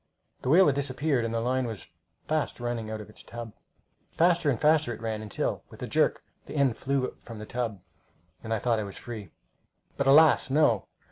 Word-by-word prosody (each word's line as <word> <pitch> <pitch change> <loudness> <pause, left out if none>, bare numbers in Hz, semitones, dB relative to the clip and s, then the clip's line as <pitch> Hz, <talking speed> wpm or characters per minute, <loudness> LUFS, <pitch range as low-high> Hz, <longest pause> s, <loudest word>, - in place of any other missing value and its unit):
The 125 - -2
whale 180 +6 +7
had 145 - +4
disappeared, 135 -2 0
and 115 - -2
the 115 - 0
line 125 +2 0
was 110 -6 -7 0.4
fast 155 -4 -1
running 120 -2 -3
out 110 0 -4
of 105 - -10
its - - -11
tub. 115 -2 -8 0.6
Faster 170 -2 +4
and 130 - 0
faster 155 -3 +3
it 115 - -6
ran, 110 -1 -3
until, 105 -3 -3
with - - -10
a - - -3
jerk, - - +1 0.2
the - - -8
end 140 -5 +2
flew 135 +1 -1
from 115 -1 -10
the 105 - -7
tub, 115 -4 -3 0.6
and 110 - -6
I 110 - +2
thought 115 0 +1
I - - -2
was 100 -1 -8
free. 110 -6 -8 0.7
But 140 - 0
alas, 150 0 +6
no! 135 -7 +3
120 Hz, 205 wpm, -28 LUFS, 110-140 Hz, 0.7 s, whale